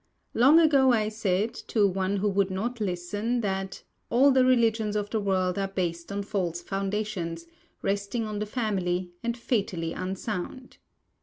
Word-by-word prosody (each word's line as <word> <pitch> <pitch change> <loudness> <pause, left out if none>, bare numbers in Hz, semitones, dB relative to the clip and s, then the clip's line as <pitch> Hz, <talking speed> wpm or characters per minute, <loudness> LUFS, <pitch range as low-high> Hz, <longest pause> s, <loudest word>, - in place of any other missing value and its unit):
Long 275 +8 +6
ago 280 -5 +5
I 215 -3 +2
said, 215 0 0
to 215 -3 0
one 190 +1 -1
who 205 +2 +1
would 195 0 +1
not 225 +5 -3
listen, 205 +6 -1
that 195 -2 -3 0.3
"all 270 +4 +5
the 260 -1 +5
religions 225 -4 +2
of 205 0 -2
the 220 - +1
world 190 -2 0
are 195 - 0
based 175 -2 -3
on 200 0 -2
false 180 -5 -2
foundations, 195 -4 -3 0.4
resting 200 +3 -1
on 210 -1 -4
the 210 - -2
Family, 185 -6 -1
and 235 0 -2
fatally 195 -9 -1
unsound." 195 +6 -5
205 Hz, 155 wpm, -27 LUFS, 190-225 Hz, 0.4 s, Long